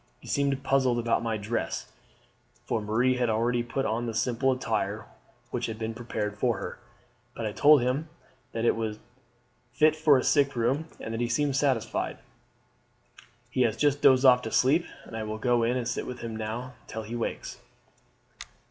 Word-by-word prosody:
He - - -15
seemed 140 -1 0
puzzled 130 -3 +2
about 115 -1 +1
my 115 -2 -1
dress" 110 +3 -3 0.7
for 110 - -1
Marie 120 +5 +1
had 120 -2 +1
already 120 +2 +1
put 135 +3 -2
on 115 +1 -1
the 115 - -4
simple 125 +4 +1
attire 110 -5 -2 0.5
which - - -2
had 110 - -5
been 110 0 -3
prepared 110 -3 -4
for 120 -3 +1
her - - -6 0.6
"but 115 - -4
I 105 - -1
told 145 +5 +6
him 135 +6 -1 0.4
that 115 0 -2
it - - +4
was 110 -1 -3 0.8
fit 155 +4 +4
for 155 -3 +5
a 130 - 0
sick 140 -2 +3
room, 130 +7 0
and 110 - -5
he 120 - 0
seemed 140 +3 +1
satisfied. 135 -5 0 1.3
He 130 - 0
has 115 -2 +2
just 145 -1 +2
dozed 130 0 +6
off 125 -1 +7
to 110 - -5
sleep, 150 +7 +3 0.2
and - - -10
I 110 - -3
will 110 0 -4
go 120 +1 +2
in 120 +2 +1
and 120 -2 -2
sit 120 - -3
with 125 -1 -6
him 115 -1 -5
now 110 +4 -5
till 110 0 -5
he 110 +3 -6
wakes." 120 - -4
120 Hz, 185 wpm, -28 LUFS, 110-135 Hz, 1.3 s, off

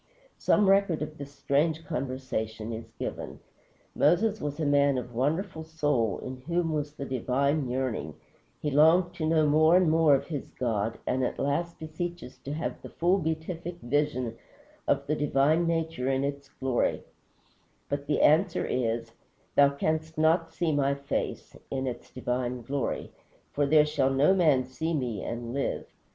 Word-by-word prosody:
_" - - -39 0.4
Some 210 -2 +3
record 195 -5 +3
of 155 0 -8
this 140 0 -7
strange 155 +3 0
conversation 125 -6 -3
is 115 +1 -7
given. - - -5 0.6
Moses 200 +8 +3
was 145 +1 -4
a 155 - 0
man 140 -1 +3
of 125 -1 -5
wonderful 160 - -1
soul, 145 - 0
in 130 0 -5
whom 165 +4 -1
was 150 -1 -2
the 140 - -5
divine 135 +2 0
yearning; 125 - -2 0.5
he 150 - 0
longed 165 +5 +5
to 160 -3 -2
know 160 -1 +3
more 155 +3 +5
and 180 -4 +3
more 160 -3 +5
of 135 +1 -2
his 150 -5 -5
God, 115 -2 -1
and 130 +1 0
at - - -1
last 165 +5 -1
beseeches 160 -2 -6
to 140 - -6
have 160 +3 -4
the - - -9
full 180 +3 +2
beatific 160 +1 -3
vision 130 -3 -1 0.5
of - - +1
the 150 - 0
divine 150 +3 +2
nature 160 -5 -1
in 135 0 +1
its 140 0 -4
glory; 130 -2 -1 0.8
but 140 0 -3
the 150 - +1
answer 165 +4 +4
is: 115 -2 -1 0.4
"Thou 140 0 +7
canst 155 +3 -2
not 165 +1 +3
see 170 -3 0
my 140 -1 +2
face 140 0 -4
[in 135 -1 -2
its 125 -2 -5
divine 125 -1 -3
glory], 135 +2 -3 0.4
for 145 0 +1
there 150 +1 +6
shall 150 -3 +1
no 135 +7 +4
man 155 -9 +4
see 160 +6 -3
me 120 -8 -2
and 120 0 -5
live." 140 0 -2
145 Hz, 165 wpm, -28 LUFS, 130-160 Hz, 0.8 s, Thou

